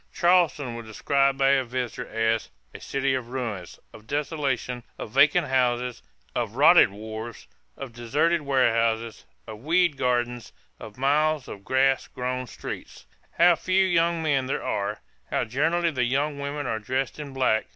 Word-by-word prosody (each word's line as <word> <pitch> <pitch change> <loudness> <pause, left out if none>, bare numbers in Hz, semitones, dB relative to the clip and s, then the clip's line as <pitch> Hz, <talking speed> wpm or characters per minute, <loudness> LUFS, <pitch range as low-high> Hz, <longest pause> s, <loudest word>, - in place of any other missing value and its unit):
Charleston 170 -8 +2
was 115 -1 -8
described 135 +5 +1
by 135 0 +3
a 135 -1 +3
visitor 125 0 -4
as 115 0 0 0.2
"a - - -9
city 135 0 -1
of 130 -3 -3
ruins, 115 -9 -5
of 110 0 -14
desolation, 140 -4 -2 0.2
of 110 - -7
vacant 140 +4 +4
houses, 125 -1 0 0.3
of 115 -2 -3
rotten 150 - +6
wharves, 110 +2 -7 0.3
of 125 -4 -8
deserted 145 +9 +1
warehouses, 115 - +1 0.2
of 110 -1 -9
weed 165 +3 +2
gardens, 120 -2 -1 0.3
of 105 +1 -11
miles 150 +1 +1
of 100 - -9
grass 135 +2 +2
grown 125 0 -4
streets.... - - -8 0.3
How 175 0 +6
few 185 +3 +2
young 170 -2 +1
men 140 -4 +1
there 135 - -2
are, 105 +1 -2 0.3
how - - 0
generally 165 +8 0
the 130 -4 -1
young 140 +3 -1
women 140 0 -4
are 110 -3 -2
dressed 130 +6 -3
in 145 -2 -6
black! 130 -5 +1
130 Hz, 155 wpm, -25 LUFS, 115-145 Hz, 0.3 s, rotten